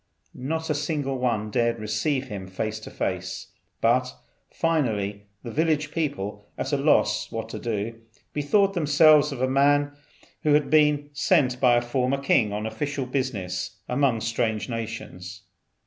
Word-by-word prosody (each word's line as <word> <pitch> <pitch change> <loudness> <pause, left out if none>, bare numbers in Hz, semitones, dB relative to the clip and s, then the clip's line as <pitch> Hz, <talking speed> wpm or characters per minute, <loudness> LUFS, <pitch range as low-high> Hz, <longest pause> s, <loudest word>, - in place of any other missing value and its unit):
Not 160 +5 -3
a - - +3
single 145 -3 -2
one 110 -4 -1
dared 115 +1 +1
receive 110 +6 -1
him 100 -6 -7
face 110 +3 -3
to 110 - -10
face; - - -4 0.3
but, 125 +2 +2 0.3
finally, 105 -11 -1 0.2
the 120 - -6
village 155 +1 +1
people, 105 -11 -3
at - - -3
a - - +3
loss - - +2
what 115 0 -4
to - - -6
do, 115 0 -3 0.3
bethought 195 +7 +2
themselves 150 -2 +5
of 130 -2 -3
a - - +3
man 145 +2 +3 0.5
who 150 -1 +4
had 150 - +1
been 150 -1 +3
sent 140 -4 +2
by 125 -2 +5
a 120 - +3
former 130 +2 0
king 125 -6 +2
on 105 +1 -3
official 140 +3 -3
business 115 -9 -3
among 125 -3 +1
strange 110 -1 -1
nations. 110 -5 -6
125 Hz, 150 wpm, -25 LUFS, 110-145 Hz, 0.5 s, themselves